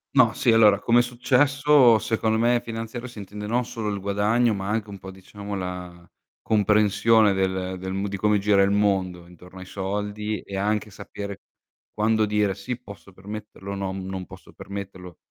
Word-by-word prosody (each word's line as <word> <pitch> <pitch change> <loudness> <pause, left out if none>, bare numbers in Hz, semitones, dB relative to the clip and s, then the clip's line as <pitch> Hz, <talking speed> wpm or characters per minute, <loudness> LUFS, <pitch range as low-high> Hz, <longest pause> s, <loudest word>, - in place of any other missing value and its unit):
No, 125 -5 +5
sì, 120 - +2
allora 105 -3 +5
come 120 +3 +4
successo, 130 +1 +4
secondo 110 +1 0
me 120 +1 +3
finanziario, 115 +2 -6
si 120 - -11
intende 105 +1 -8
non 120 +3 0
solo 115 -3 -4
il 100 -1 -3
guadagno 105 +4 +1
ma 100 -1 -4
anche 110 0 -2
un 100 - -8
po' 95 +1 -9
diciamo 100 +2 -9
la 90 -2 -7 0.3
comprensione 105 0 +3
del 95 -1 -1
del 95 +1 -5
m 100 +1 -2
di 100 - -4
come 105 +1 +2
gira 100 0 +3
il 100 - +2
mondo 95 -4 0
intorno 90 +1 -14
ai 95 - -9
soldi 105 +3 -3
e 100 - -8
anche 105 +2 -1
sapere 100 0 -8 0.5
quando 110 0 +2
dire: 105 -2 0
"Sì, 115 +5 -5
posso 100 -4 -13
permetterlo", 100 0 -8
"No, 95 -1 -3
non 95 -1 -5
posso - - -14
permetterlo". 95 -3 -8
105 Hz, 175 wpm, -24 LUFS, 95-110 Hz, 0.5 s, No